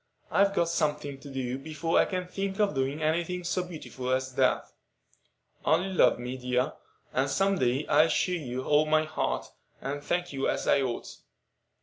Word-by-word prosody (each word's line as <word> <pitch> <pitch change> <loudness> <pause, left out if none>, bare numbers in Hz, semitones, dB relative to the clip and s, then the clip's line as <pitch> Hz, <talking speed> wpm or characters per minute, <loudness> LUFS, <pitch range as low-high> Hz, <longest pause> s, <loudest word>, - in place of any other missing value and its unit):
I've 200 0 +3
got 170 -2 +2
something 150 -4 -1
to 140 - -10
do 130 -1 -3
before 160 +3 0
I - - +5
can 185 -1 -3
think 195 +1 -3
of 205 -6 +3
doing 135 +3 -1
any 160 +3 +2
thing 180 +1 -5
so 175 +1 0
beautiful 155 -7 -6
as 130 0 0
that. - - +2 1.0
Only 180 +4 +2
love - - +5
me, 125 +2 -5
dear, 125 0 0 0.4
and 135 +2 +1
some 195 +6 +2
day 130 +4 +1
I'll 155 +2 +5
show 180 - +1
you 130 -7 -3
all 150 +2 +3
my 155 0 +4
heart, 155 - -2 0.3
and 145 +1 -4
thank 175 +1 -1
you 135 0 0
as - - -2
I 140 - +4
ought." 125 -3 -4
150 Hz, 185 wpm, -28 LUFS, 130-175 Hz, 1.0 s, I